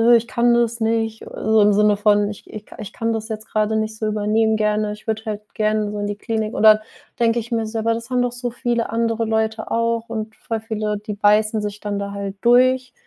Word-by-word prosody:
ich 230 Hz, 0 st, +1 dB
kann 240 Hz, +1 st, +2 dB
das 235 Hz, 0 st, +1 dB
nicht.“ 225 Hz, 0 st, -1 dB
So 220 Hz, 0 st, +2 dB
im 205 Hz, 0 st, +5 dB
Sinne 210 Hz, 0 st, +3 dB
von 205 Hz, 0 st, +3 dB
ich 210 Hz, -, -10 dB
ich 210 Hz, -1 st, -9 dB
ka -, -, -15 dB
ich 210 Hz, -, -7 dB
kann 230 Hz, 0 st, -1 dB
das 220 Hz, -1 st, -4 dB
jetzt 220 Hz, 0 st, -6 dB
grade 215 Hz, 0 st, 0 dB
nicht 220 Hz, 0 st, -2 dB
so 215 Hz, -, -2 dB
übernehmen 215 Hz, +1 st, +1 dB
gerne. 210 Hz, 0 st, 0 dB
Ich 210 Hz, -, -14 dB
würde 220 Hz, 0 st, -2 dB
halt 210 Hz, -1 st, -6 dB
gerne 215 Hz, -1 st, 0 dB
so 210 Hz, -, -5 dB
in 205 Hz, -, -2 dB
die 205 Hz, -, -3 dB
Klinik 220 Hz, 0 st, -3 dB
oder 215 Hz, 0 st, +6 dB, 0.4 s
denke 235 Hz, 0 st, +2 dB
ich 235 Hz, +2 st, -8 dB
mir 225 Hz, -1 st, 0 dB
so, 225 Hz, 0 st, -3 dB
aber 230 Hz, +1 st, +1 dB
das 230 Hz, +2 st, -7 dB
haben 250 Hz, -1 st, +1 dB
doch 245 Hz, -1 st, 0 dB
so 245 Hz, 0 st, -3 dB
viele 240 Hz, -1 st, -1 dB
andere 230 Hz, 0 st, 0 dB
Leute 220 Hz, 0 st, -1 dB
auch 230 Hz, 0 st, 0 dB
und 220 Hz, -1 st, -5 dB
voll 225 Hz, -1 st, -4 dB
viele, 215 Hz, -1 st, -2 dB
die 210 Hz, 0 st, -6 dB
beißen 210 Hz, +1 st, +3 dB
sich 210 Hz, 0 st, -5 dB
dann 205 Hz, -1 st, -3 dB
da 200 Hz, 0 st, -4 dB
halt 200 Hz, -1 st, -5 dB
durch 255 Hz, +1 st, +3 dB
220 Hz, 240 wpm, -21 LUFS, 210-230 Hz, 0.4 s, oder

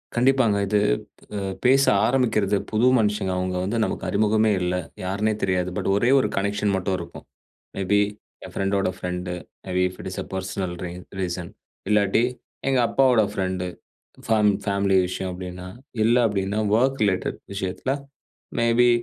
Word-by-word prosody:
கண்டிப்பாங்க. 120 Hz, -4 st, +3 dB
இது 105 Hz, +1 st, +2 dB, 0.6 s
அ -, -, -1 dB, 0.3 s
பேச 135 Hz, +2 st, +5 dB, 0.2 s
ஆரம்பிக்கறது 110 Hz, -6 st, +2 dB
புது 110 Hz, +3 st, +2 dB
மனுஷங்க 105 Hz, -3 st, 0 dB
அவுங்க 90 Hz, 0 st, -1 dB
வந்து 115 Hz, +5 st, -1 dB
நமக்கு -, -, -3 dB
அறிமுகமே 110 Hz, +1 st, +3 dB
இல்ல. 90 Hz, 0 st, 0 dB, 0.3 s
யாருன்னே 100 Hz, +4 st, 0 dB
தெரியாது. 90 Hz, -1 st, +1 dB
பட் -, -, -2 dB
ஒரே 120 Hz, +4 st, +2 dB
ஒரு 130 Hz, -, +2 dB
கனெக்ஷன் 100 Hz, +1 st, 0 dB
மட்டும் 95 Hz, 0 st, -1 dB
இருக்கும். 85 Hz, -1 st, -9 dB, 0.5 s
மே 100 Hz, -, -3 dB
பீ 105 Hz, -, +5 dB, 0.5 s
என் -, -, -11 dB
ஃப்ரெண்டோட 100 Hz, 0 st, 0 dB
friend, 90 Hz, 0 st, -4 dB, 0.4 s
May 95 Hz, -, -5 dB
B 90 Hz, -, +3 dB
if 90 Hz, -, -13 dB
it -, -, -4 dB
is -, -, -4 dB
a -, -, -13 dB
personal 95 Hz, -1 st, -3 dB
ரீன் 90 Hz, +1 st, -7 dB, 0.2 s
reason. 90 Hz, -1 st, -3 dB, 0.4 s
இல்லாட்டி 105 Hz, +1 st, +3 dB, 0.5 s
எங்க 135 Hz, -1 st, +3 dB
அப்பாவோட 130 Hz, -4 st, +4 dB
ஃப்ரெண்ட் 95 Hz, -2 st, -2 dB, 0.6 s
ஃபேம் 105 Hz, -2 st, +4 dB
ஃபேமிலி 100 Hz, -1 st, +1 dB
விஷயம் 90 Hz, 0 st, -4 dB
அப்டின்னா, 90 Hz, 0 st, -7 dB, 0.4 s
இல்ல 115 Hz, +2 st, +4 dB
அப்டின்னா 100 Hz, 0 st, -1 dB
வொர்க் 130 Hz, +3 st, +2 dB
ரிலேட்டட் 100 Hz, -3 st, 0 dB, 0.2 s
விஷயத்துல, 100 Hz, +6 st, -2 dB, 0.7 s
மே 115 Hz, -, +2 dB
பீ 120 Hz, -, +6 dB
100 Hz, 155 wpm, -24 LUFS, 95-110 Hz, 0.7 s, பீ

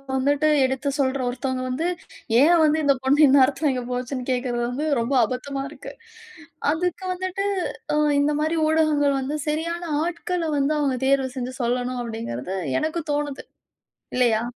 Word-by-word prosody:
வந்துட்டு 285 Hz, +3 st, +2 dB, 0.2 s
எடுத்து 265 Hz, +2 st, -1 dB
சொல்ற 270 Hz, 0 st, +1 dB
ஒருத்தவங்க 255 Hz, +1 st, -3 dB
வந்து, 305 Hz, +7 st, -1 dB, 0.5 s
ஏன் 330 Hz, +3 st, +5 dB
வந்து 310 Hz, +1 st, +3 dB
இந்த 280 Hz, -1 st, +4 dB
பொண்ணு 285 Hz, +3 st, +5 dB
இந்நேரத்தில 275 Hz, +2 st, +4 dB
இங்க 250 Hz, -1 st, -3 dB
போச்சுன்னு 250 Hz, +1 st, -3 dB
கேட்கிறது 245 Hz, -1 st, -1 dB
வந்து 290 Hz, +5 st, -2 dB
ரொம்ப 245 Hz, +4 st, -1 dB
அபத்தமா 270 Hz, +4 st, -4 dB
இருக்கு. 290 Hz, -, -10 dB, 0.8 s
அதுக்கு 360 Hz, +3 st, -2 dB
வந்துட்டு, 375 Hz, +2 st, -3 dB, 0.5 s
"அ -, -, +2 dB, 0.2 s
இந்த 295 Hz, +1 st, +2 dB
மாரி 315 Hz, +2 st, 0 dB
ஊடகங்கள் 300 Hz, -3 st, +2 dB
வந்து 280 Hz, +3 st, -3 dB
சரியான 335 Hz, +3 st, -2 dB, 0.2 s
ஆட்கள 350 Hz, +1 st, -2 dB
வந்து 280 Hz, +2 st, +1 dB
அவங்க 275 Hz, -3 st, 0 dB
தேர்வு 270 Hz, -1 st, +2 dB
செஞ்சு 255 Hz, 0 st, -4 dB
சொல்லணும்." 245 Hz, +1 st, -1 dB
அப்படீங்கிறது 195 Hz, -, -5 dB, 0.2 s
எனக்கு 315 Hz, +2 st, -2 dB
தோணுது, 290 Hz, -1 st, -3 dB, 0.7 s
இல்லையா? 235 Hz, -3 st, +2 dB
275 Hz, 145 wpm, -23 LUFS, 255-310 Hz, 0.8 s, ஏன்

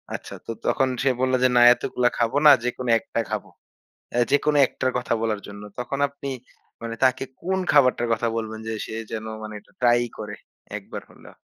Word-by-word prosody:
আচ্ছা -, -, -8 dB
তো -, -, -4 dB, 0.2 s
তখন 135 Hz, -, +2 dB, 0.2 s
সে 140 Hz, -, +4 dB
বলল 130 Hz, 0 st, +1 dB
যে 130 Hz, -, +5 dB
না -, -, +7 dB
এতগুলা 125 Hz, 0 st, 0 dB
খাবো 120 Hz, +3 st, +1 dB
না 150 Hz, -, +11 dB
যেকোনো 125 Hz, 0 st, -3 dB
একটা 115 Hz, -, -4 dB
খাবো। -, -, -3 dB, 0.6 s
অ্যাঁ 120 Hz, 0 st, +3 dB
যেকোনো 145 Hz, +1 st, +3 dB
একটার 130 Hz, -, -2 dB
কথা 120 Hz, -1 st, -1 dB
বলার 110 Hz, -2 st, -1 dB
জন্য। 100 Hz, 0 st, -10 dB, 0.2 s
তখন 130 Hz, +3 st, -3 dB
আপনি 140 Hz, 0 st, -7 dB, 0.5 s
মানে 115 Hz, 0 st, -4 dB
তাকে 130 Hz, 0 st, +2 dB, 0.2 s
কোন 190 Hz, +1 st, 0 dB
খাবারটার 125 Hz, -4 st, +4 dB
কথা 115 Hz, +1 st, +1 dB
বলবেন 110 Hz, -1 st, -4 dB
যে -, -, -2 dB
সে -, -, -7 dB, 0.2 s
যেন 110 Hz, 0 st, -4 dB, 0.2 s
মানে 110 Hz, 0 st, -7 dB
এটা -, -, -27 dB
ট্রাই 120 Hz, -1 st, +4 dB, 0.2 s
করে, 105 Hz, -1 st, -6 dB, 0.4 s
একবার -, -, -8 dB
হলেও। -, -, -16 dB
120 Hz, 190 wpm, -24 LUFS, 115-130 Hz, 0.6 s, না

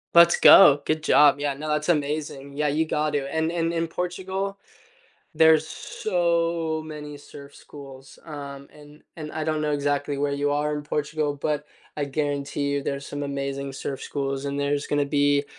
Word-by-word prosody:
Let's 170 Hz, 0 st, +7 dB
go. 145 Hz, -7 st, +8 dB
Good 155 Hz, 0 st, -1 dB
job. 145 Hz, -1 st, +5 dB
Yeah. 145 Hz, -1 st, -1 dB
No, 155 Hz, +3 st, -6 dB
that's 150 Hz, +2 st, -1 dB
amazing. 145 Hz, -2 st, -2 dB
Yeah, 150 Hz, +1 st, -1 dB
you 155 Hz, +3 st, +1 dB
got 150 Hz, -1 st, -1 dB
to. 140 Hz, -2 st, -2 dB
And 160 Hz, +1 st, 0 dB
and 165 Hz, -1 st, -1 dB
in 165 Hz, 0 st, -1 dB
Portugal, 190 Hz, +3 st, -4 dB, 0.8 s
there's 160 Hz, -1 st, +5 dB
so 170 Hz, -3 st, -1 dB
many 150 Hz, -1 st, -8 dB
surf 140 Hz, 0 st, -13 dB
schools. 135 Hz, -2 st, -13 dB
Um, 140 Hz, -2 st, -8 dB
and 150 Hz, 0 st, -16 dB
and 155 Hz, -2 st, -7 dB
I 155 Hz, -1 st, -4 dB
don't 155 Hz, -1 st, -1 dB
know 150 Hz, -1 st, 0 dB
exactly 145 Hz, 0 st, -1 dB
where 140 Hz, 0 st, 0 dB
you 145 Hz, 0 st, 0 dB
are 150 Hz, +1 st, 0 dB
in 150 Hz, -, -3 dB
Portugal, 150 Hz, 0 st, -2 dB
but 150 Hz, +1 st, -2 dB, 0.3 s
I 145 Hz, -, -2 dB
guarantee 140 Hz, 0 st, -2 dB
you 140 Hz, -1 st, -1 dB
there's 140 Hz, 0 st, -4 dB
some 145 Hz, 0 st, -5 dB
amazing 140 Hz, -1 st, -4 dB
surf 135 Hz, 0 st, -5 dB
schools, 140 Hz, -1 st, -3 dB
and 140 Hz, 0 st, -3 dB
there's 145 Hz, 0 st, -1 dB
gonna 145 Hz, -1 st, 0 dB
be 145 Hz, 0 st, +2 dB
145 Hz, 175 wpm, -24 LUFS, 140-155 Hz, 0.8 s, go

